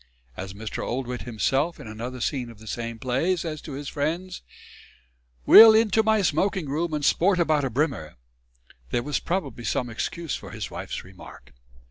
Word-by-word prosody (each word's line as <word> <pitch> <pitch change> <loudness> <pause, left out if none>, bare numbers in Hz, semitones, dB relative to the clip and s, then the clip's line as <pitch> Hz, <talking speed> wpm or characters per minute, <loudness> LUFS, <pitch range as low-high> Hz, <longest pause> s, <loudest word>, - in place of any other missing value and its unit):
As 95 +1 -7
Mr. 110 +1 -5
Oldwit 125 0 -4
himself, 135 +8 0
in 150 - -10
another 120 +3 -6
scene 125 -2 -2
of 115 - -13
the 110 - -15
same 115 +1 -5
play, 130 +10 0
says 160 -3 -5
to 150 - -8
his 140 +1 -6
friends, 165 +6 -3 1.0
"We'll 220 0 +10
into 220 -1 +4
my 220 -1 +2
smoking 180 +1 0
room 160 +5 -1
and 145 -1 -2
sport 185 +5 +3
about 155 -4 +2
a - - -1
brimmer," 125 - -2 0.7
there 120 - -1
was 145 +1 -1
probably 145 -10 -3
some 120 0 -1
excuse 160 +7 -3
for - - -9
his - - -6
wife's - - -6
remark. 95 0 -14
140 Hz, 170 wpm, -25 LUFS, 120-170 Hz, 1.0 s, We'll